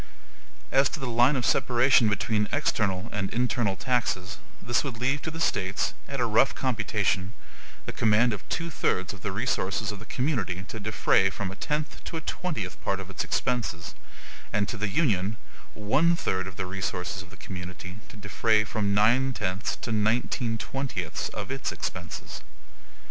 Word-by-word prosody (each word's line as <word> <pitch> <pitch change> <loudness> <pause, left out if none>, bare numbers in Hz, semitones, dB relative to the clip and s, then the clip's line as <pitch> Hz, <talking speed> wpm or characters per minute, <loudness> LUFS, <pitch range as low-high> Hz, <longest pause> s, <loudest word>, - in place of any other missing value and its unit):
As 135 0 +5
to 160 - -5
the 135 - -3
line 120 +3 +4
of 125 - 0
separation 125 -3 +4
between 105 +1 +1
external 105 -10 +1
and 100 -2 -1
internal 120 -4 +1
taxes, 110 -5 0 0.2
this 120 0 +1
would 135 -5 -4
leave 135 +4 +1
to - - -3
the 160 +1 -6
States, 95 -10 +1
at 140 -1 -4
a 120 - +3
rough 115 +4 +4
computation, 110 -5 0 0.5
the - - -3
command 110 +2 +4
of 100 - -4
two 165 0 -2
thirds - - 0
of - - -11
the - - -2
resources 100 +2 0
of 105 - -7
the 110 - -11
community 110 - -1
to 110 - -5
defray 100 -2 +3
from 95 0 -4
a - - -7
tenth 150 +6 -3
to 165 - -4
a - - -4
twentieth 110 - -3
part 100 - 0
of 95 0 -7
its - - -2
expenses; 115 -10 -1 0.6
and 100 -1 +1
to - - -2
the 105 0 -1
Union, 110 - +1 0.4
one 140 +11 +3
third 95 - -1
of 95 - -8
the 95 - -3
resources 95 0 -3
of 95 - -12
the 95 - -13
community, 90 0 -7
to - - -12
defray 110 +1 +2
from 100 -1 0
nine 120 +6 +4
tenths 95 -2 -1
to - - -5
nineteen 115 +1 +1
twentieths 135 +4 -3
of - - -5
its 135 -1 -2
expenses. 85 -3 -5
110 Hz, 175 wpm, -27 LUFS, 95-125 Hz, 0.6 s, As